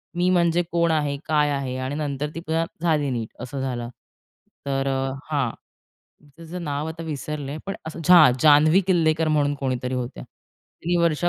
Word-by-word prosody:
मी 175 +1 +2
म्हणजे 175 -1 +3
कोण 170 -1 +2
आहे? 145 -2 0
काय 150 -2 +2
आहे? 135 -3 -2
आणि 130 +2 -3
नंतर 145 -1 -3
ती - - -3
पुन्हा 165 0 -1 0.2
झाली 155 -4 +1
नीट, 115 -4 -3
असं 135 +2 -5
झालं. 120 -3 -3 0.8
तर 135 0 -1
अ, 135 0 -1 0.2
हां. 140 -6 +1 0.9
त्याचं 170 +2 -8
नाव 145 0 -2
आता 165 +1 -6
विसरले, 150 -2 -5
पण, 195 - -3 0.3
हां! 170 -8 +8
जान्हवी 155 +4 +6
किल्लेकर 160 -3 +2
म्हणून 145 -1 +2
कोणीतरी 130 -2 -2
होत्या. 125 -1 -4
ती 175 +1 -6
वर्षा 170 0 +2
150 Hz, 160 wpm, -23 LUFS, 135-165 Hz, 0.9 s, हां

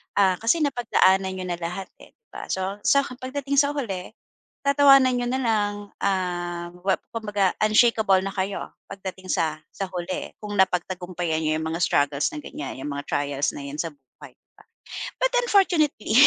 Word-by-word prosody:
Ah, 190 -3 +3
kasi 305 +8 +2
napagdaanan 195 -8 +2
n'yo 185 - -5
na 175 -1 -3
lahat 180 +3 -5
eh, - - -17
'di 460 - -64
ba? - - -8
So, 190 +2 -2
sa 280 0 +5
pagdating 270 +2 -2
sa 290 +1 +2
huli 195 -10 -4 0.5
tatawanan 275 -2 +6
n'yo 245 - -1
nalang, 225 -5 +1 0.2
ah, 175 -3 -2
well 190 0 +3 0.2
kumbaga 205 -4 0
unshakeable 215 -2 +4
na 195 - -3
kayo 195 0 -3 0.2
pagdating 190 -1 -8
sa 155 -1 0 0.2
sa 195 - -3
huli 180 0 -4
kung 210 -1 -6
napagtagumpayan 180 -3 0
n'yo 155 0 +1
yung 160 - -3
mga 165 - -3
struggles 145 -1 +2
na 150 - -6
ganyan, 140 -2 -7
yung 135 - -5
mga 140 0 -4
trials 145 0 0
na 140 - -6
'yan 140 - -6
sa 165 0 -2
buhay, 135 -3 -16
'di - - -37 0.8
ba? - - +4
But - - -27
unfortunately, 340 - +2
190 Hz, 170 wpm, -24 LUFS, 175-245 Hz, 0.8 s, tatawanan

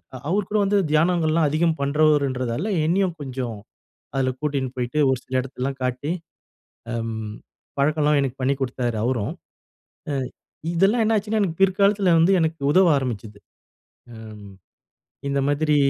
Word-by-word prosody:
அ - - -7
அவரு 200 +3 +1
கூட 210 - +1
வந்து 205 +1 +2
தியானங்கள்லாம் 160 0 +3
அதிகம் 160 +2 +1
பண்றவருன்றதால 140 - +1 0.2
என்னையும் 185 +2 +1
கொஞ்சம் 130 -5 -4 0.6
அதுல 130 -1 +1
கூட்டின்னு 140 -4 -2
போயிட்டு 125 +4 -1
ஒரு 130 - +2
சில 130 0 0
எடத்தலாம் 135 +1 -5
காட்டி, 130 +5 -2 0.8
அம் 110 -2 -4 0.4
பழக்கம்லாம் 150 +1 +3
எனக்கு 135 -1 -2
பண்ணி 135 +2 +2
குடுத்தாரு 125 -3 -2
அவரும். 120 0 -1 0.8
அ - - -1 0.6
இதெல்லாம் 200 +7 +3
என்னாச்சுன்னா, 215 0 +1
எனக்கு 175 -4 -2
பிற்காலத்துல 195 -1 +3
வந்து 170 +4 +4
எனக்கு 160 -2 -1
உதவ 185 -1 +6
ஆரம்பிச்சது. 110 -6 -4 0.8
அம் 105 -2 -10 0.8
இந்த 140 0 +1
மாதிரி 150 +1 +2
145 Hz, 130 wpm, -23 LUFS, 125-170 Hz, 0.8 s, உதவ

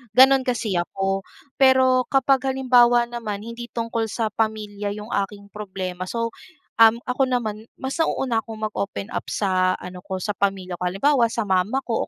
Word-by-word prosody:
Gano'n 265 0 +6
kasi 220 -7 0
ako. 195 +2 -2 0.3
Pero 260 -1 +5
kapag 270 0 +2
halimbawa 245 -2 +4
naman, 225 -4 -5
hindi 235 +1 -7
tungkol 230 -1 -2
sa 220 -1 -2
pamilya 210 -2 -2
'yong 210 +2 -8 0.2
aking 200 -1 -14
problema, 185 -3 -5
so, 230 +1 -2 0.5
um, 225 +2 +6
ako 260 +1 0
naman 220 -3 -2
mas 265 +5 -5
nauuna 255 -7 +1
akong 220 -1 -8
mag-open 205 0 -4
up - - -4
sa 185 -2 +1
ano 180 0 -9
ko, 190 -1 -5
sa 210 - -1
pamilya 190 -3 -2
ko. 180 - -1
Halimbawa 235 +6 +3
sa 230 0 -2
mama 200 +7 0
ko 230 -3 -2
220 Hz, 165 wpm, -23 LUFS, 200-245 Hz, 0.5 s, Gano'n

